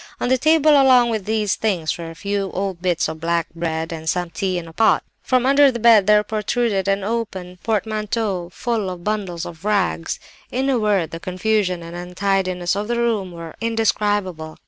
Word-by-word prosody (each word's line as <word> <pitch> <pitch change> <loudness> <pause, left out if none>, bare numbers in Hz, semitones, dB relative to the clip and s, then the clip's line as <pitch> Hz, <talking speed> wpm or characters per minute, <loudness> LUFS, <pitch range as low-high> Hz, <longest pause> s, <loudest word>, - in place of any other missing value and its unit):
"On - - -1
the 260 - +4
table 310 +1 +4
along 260 -4 +5
with 215 -4 -2
these 215 -2 0
things 180 -8 -1
were 170 -1 -7
a 165 - -10
few 200 +2 -2
old 190 -2 -3
bits 175 -2 +1
of 160 0 -7
black 170 0 0
bread, 165 -1 -3
and 160 0 -4
some 175 -1 -1
tea 185 +2 -1
in 170 -1 -5
a 165 - -12
pot. 220 +6 +3 0.2
From 255 -1 +1
under 280 +1 +5
the 240 - -4
bed 225 -4 +5
there 210 0 +5
protruded 210 -2 -1
an 195 0 +1
open 195 -5 -4
portmanteau 215 -4 -1
full 225 -2 -2
of 180 -1 -7
bundles 190 -5 -2
of 165 0 -10
rags. 200 -5 0 0.3
In 265 +2 0
a 250 - +2
word, 205 -6 +1
the 165 - -6
confusion 185 0 -1
and 170 +1 -9
untidiness 180 0 -1
of 205 +1 -3
the 240 0 -1
room 225 -6 0
were 165 -2 -8
indescribable. 205 -7 -1
195 Hz, 190 wpm, -21 LUFS, 175-225 Hz, 0.3 s, along